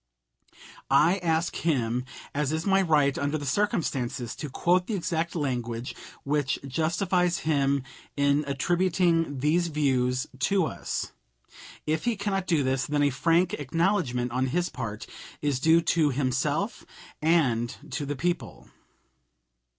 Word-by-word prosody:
I 160 +8 +4
ask 165 -1 0
him, 125 -6 0 0.3
as 145 -1 0
is 160 +1 -2
my 195 -1 +4
right 150 -6 +3
under 145 +2 0
the 145 - -6
circumstances, 135 - -1
to 150 - -5
quote 180 +6 +1
the 220 - -1
exact 170 -2 -2
language 120 -5 -3 0.3
which 140 -2 0
justifies 175 +5 0
him 140 -3 +2 0.3
in 140 +1 +3
attributing 165 0 +1
these 170 +4 +2
views 130 -5 +1
to 190 +5 +2
us. - - -4 0.7
If 155 +1 -1
he 240 -2 +1
cannot 195 -2 -2
do 160 -5 +2
this, 130 0 0
then 145 0 +1
a 145 - +3
frank 165 +6 +2
acknowledgment 145 - 0
on 130 +2 0
his 175 +6 0
part 110 -1 -5 0.3
is 145 -3 0
due 160 +3 +5
to 160 -3 +3
himself 130 -1 -1 0.4
and 135 -8 +2
to 145 -2 -3
the 145 - -2
people. 175 +4 -3
150 Hz, 135 wpm, -27 LUFS, 135-170 Hz, 0.7 s, due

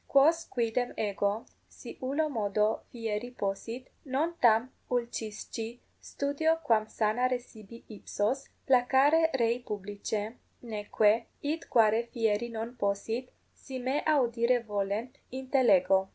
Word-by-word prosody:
Quos 320 +5 +4
quidem 240 +1 -1
ego, 205 +1 -1 0.2
si - - -10
ullo 280 +5 0
modo 215 -4 0
fieri 225 0 -3
possit, 225 +6 -3 0.2
non 290 +6 0
tam 235 +2 +4 0.2
ulcisci 230 -1 -3 0.2
studeo 290 +3 0
quam 220 -6 +3
sanare 245 +4 +1
sibi 230 -1 -14
ipsos, 215 +4 -2 0.2
placare 270 +5 +4
rei 235 0 +2
publicae, 210 0 -4 0.3
neque, 215 -1 +1 0.2
id 310 +3 -2
quare 225 0 +4
fieri 225 0 0
non 230 +2 -5
possit, 225 +4 -2 0.2
si 265 -1 -8
me 260 +4 0
audire 245 -4 +3
volent, 210 +4 -2 0.2
intellego. 195 -8 +3
235 Hz, 110 wpm, -30 LUFS, 215-260 Hz, 0.3 s, Quos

